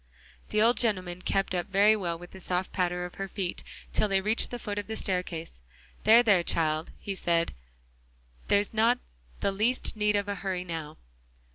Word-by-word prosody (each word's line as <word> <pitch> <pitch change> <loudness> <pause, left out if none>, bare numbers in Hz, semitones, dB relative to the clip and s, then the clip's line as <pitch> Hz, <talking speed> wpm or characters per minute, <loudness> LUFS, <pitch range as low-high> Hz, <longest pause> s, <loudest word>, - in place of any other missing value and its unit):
The 215 0 +3
old 235 +2 +4
gentleman 185 -6 +1
kept 195 0 0
up 175 0 -1
very 200 +2 +5
well 175 -5 -2
with 175 +1 -12
the 190 - -11
soft 180 0 -2
patter 180 -1 -1
of 180 - -8
her 195 - -2
feet 185 -1 -3 0.3
till 215 - +2
they 195 -1 +2
reached 215 +4 +1
the 245 - -4
foot 205 -3 -4
of 205 - -6
the 220 - -4
staircase. 180 - -3 0.4
"There, 230 +2 +8
there, 200 -6 +5
child," 160 -2 0
he 200 - -4
said, 170 -3 0 0.9
"there's 205 +1 +2
not 230 +3 +4 0.4
the 200 - +2
least 225 +7 0
need 210 -1 +2
of 200 -1 +1
hurry 190 -2 -3
now." 160 -3 -6
195 Hz, 180 wpm, -28 LUFS, 175-210 Hz, 0.9 s, There